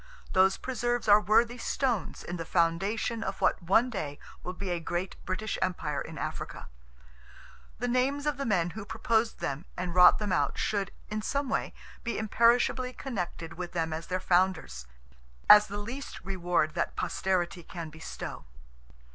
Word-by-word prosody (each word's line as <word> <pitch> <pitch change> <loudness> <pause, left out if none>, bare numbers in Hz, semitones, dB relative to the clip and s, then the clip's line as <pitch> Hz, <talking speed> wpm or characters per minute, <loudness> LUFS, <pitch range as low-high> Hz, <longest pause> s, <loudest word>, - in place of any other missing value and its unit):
Those 190 +1 +4
preserves 240 -2 -2
are 205 0 +7
worthy 230 +4 +3
stones 240 - -1
in 175 - -5
the 165 - -3
foundation 195 +8 0
of 195 -1 -4
what - - +2
one 225 +8 +3
day 145 -9 -4 0.2
will 180 - -5
be 190 0 -4
a 175 - 0
great 175 +3 -3
British 210 +3 -2
empire 170 -5 -1
in 160 -1 -7
Africa. - - -5 1.1
The 245 - -2
names 265 +4 +1
of 295 -3 0
the 275 - -2
men 175 -5 +1
who 220 +2 -7
proposed 225 +2 0
them 140 +6 -3
and 180 -1 -3
wrought 180 0 +8
them 210 -2 -2
out 145 -5 +1
should, 200 -3 0 0.2
in 215 0 -1
some 280 +4 -1
way, - - -1 0.3
be 235 - -2
imperishably 235 +3 +3
connected 180 -10 -5
with 180 0 -5
them 165 -2 -1
as 160 +1 -5
their 185 0 -1
founders, 175 - +1 0.6
as 210 0 +9
the 205 - -5
least 240 +7 -6
reward 175 -4 0
that 170 - -1
Posterity 180 -1 -1
can 165 -1 -7
bestow. 160 +1 -7
190 Hz, 165 wpm, -29 LUFS, 175-230 Hz, 1.1 s, as